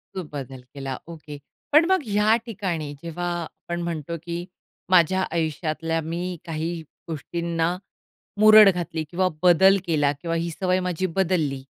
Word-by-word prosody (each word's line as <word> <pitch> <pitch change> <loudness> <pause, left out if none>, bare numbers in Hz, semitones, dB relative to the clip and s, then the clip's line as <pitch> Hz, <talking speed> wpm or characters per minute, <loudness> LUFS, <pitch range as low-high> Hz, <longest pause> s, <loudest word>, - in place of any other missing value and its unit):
तो 185 - -3
बदल 135 -2 -6
केला 135 -2 -5
ओके. 155 -3 -9 0.3
पण 305 +3 +6
मग 375 - +3
या 210 +2 +3
ठिकाणी 180 -10 -3
जेव्हा 170 +1 -4 0.2
आपण 175 +2 -6
म्हणतो, 170 -1 -4
की 170 0 -4 0.4
माझ्या 185 +1 +4
आयुष्यातल्या 165 0 -1
मी 175 +3 -4
काही 165 0 -3 0.3
गोष्टींना 170 +2 -2 0.6
मुरड 215 -1 +9
घातली 170 -3 -2
किंवा 185 +2 +1 0.2
बदल 190 +3 +6
केला 145 -4 +2
किंवा 165 -1 -2
ही 170 +1 -1
सवय 185 +2 0
माझी 180 0 -2
बदलली, 160 -8 0
170 Hz, 140 wpm, -24 LUFS, 160-185 Hz, 0.6 s, मुरड